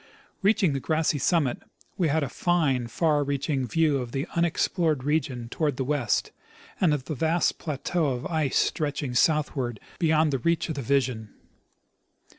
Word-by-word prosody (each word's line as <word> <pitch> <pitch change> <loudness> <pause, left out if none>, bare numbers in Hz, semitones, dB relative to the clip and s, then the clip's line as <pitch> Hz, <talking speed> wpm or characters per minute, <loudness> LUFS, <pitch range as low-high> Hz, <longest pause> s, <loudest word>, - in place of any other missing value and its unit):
Reaching 195 -5 +3
the 135 - -1
grassy 155 0 0
summit, 145 -3 +1 0.4
we 175 - +1
had 155 +1 +1
a - - -1
fine, 140 -7 +1
far 150 +4 +1
reaching 140 -1 -1
view 150 +2 +2
of 120 -2 -6
the 135 +2 -1
unexplored 170 -3 +1
region 140 -5 -1
toward 145 +1 -1
the 135 - 0
west, 130 -5 0 0.5
and 180 -5 +3
of 145 -3 -1
the 155 - -3
vast 165 +4 +1
plateau 155 +2 -1
of 125 -2 -2
ice 155 -6 0
stretching 145 -4 -1
southward 130 -4 +1 0.2
beyond 155 -2 +3
the 135 - 0
reach 170 +6 0
of - - -1
the 140 - -4
vision. 125 -5 -1
145 Hz, 160 wpm, -26 LUFS, 130-160 Hz, 0.5 s, Reaching